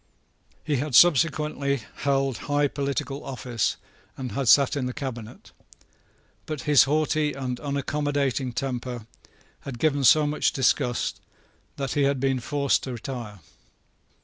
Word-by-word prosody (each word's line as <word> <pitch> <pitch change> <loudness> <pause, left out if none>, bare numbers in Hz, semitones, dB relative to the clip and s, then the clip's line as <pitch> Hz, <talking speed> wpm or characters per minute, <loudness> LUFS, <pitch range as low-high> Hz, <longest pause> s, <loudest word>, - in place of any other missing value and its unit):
He 150 -3 0
had 140 0 -2
subsequently 150 -4 +3
held 135 -2 0
high 145 0 +3
political 140 0 -3
office, 125 -4 -2 0.4
and 130 -3 -5
had 135 +4 -2
sate 140 +6 +5
in 130 -3 -1
the 125 - -4
Cabinet. 120 -4 -7 1.0
But 155 -4 -4
his 150 -3 +5
haughty 150 +1 +1
and 125 -2 -4
unaccommodating 140 -2 -1
temper 125 -3 -4 0.5
had 135 -3 -8
given 145 +1 +1
so 150 +4 +6
much 150 +1 0
disgust 125 -2 0 0.5
that 135 -2 -3
he 145 - 0
had 140 -1 +1
been 135 0 +1
forced 140 +2 0
to 130 - -5
retire. 115 -5 -7
140 Hz, 130 wpm, -25 LUFS, 125-145 Hz, 1.0 s, so